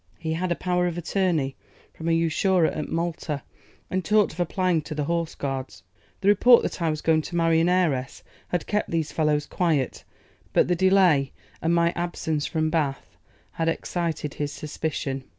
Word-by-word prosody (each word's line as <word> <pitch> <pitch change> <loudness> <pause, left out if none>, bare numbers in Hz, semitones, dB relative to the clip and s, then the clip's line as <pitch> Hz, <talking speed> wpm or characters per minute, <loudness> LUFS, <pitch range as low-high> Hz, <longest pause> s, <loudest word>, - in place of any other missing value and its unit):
He 160 -2 -3
had 175 +2 -2
a - - +2
power 180 0 0
of 175 -1 -3
attorney 170 -6 0 0.4
from 160 - -7
an 165 - +3
usurer 165 +2 +2
at 155 -1 -2
Malta, 165 -3 -3 0.4
and 185 0 -2
talked 210 -2 +3
of 170 - -14
applying 175 -1 +1
to 155 +1 -7
the 150 - -1
Horse 170 +1 -2
Guards. 135 - -5 0.4
The 195 - -1
report 235 +4 +6
that - - -4
I 165 - +2
was 155 -1 -2
going 160 -1 +3
to 170 - -7
marry 165 -1 +3
an 165 +2 +3
heiress 155 -8 0 0.2
had 175 - -2
kept 210 0 -1
these 160 -2 -1
fellows 150 -2 +1
quiet, 155 -7 -1 0.5
but - - +4
the 180 - +2
delay 180 -7 +4 0.3
and 165 +1 +2
my 170 0 +3
absence 160 -3 -2
from 155 -1 -1
Bath 145 -5 -2 0.4
had 165 0 -1
excited 165 -3 -2
his 145 -1 -3
suspicion. 145 -3 -4
165 Hz, 180 wpm, -25 LUFS, 150-175 Hz, 0.5 s, report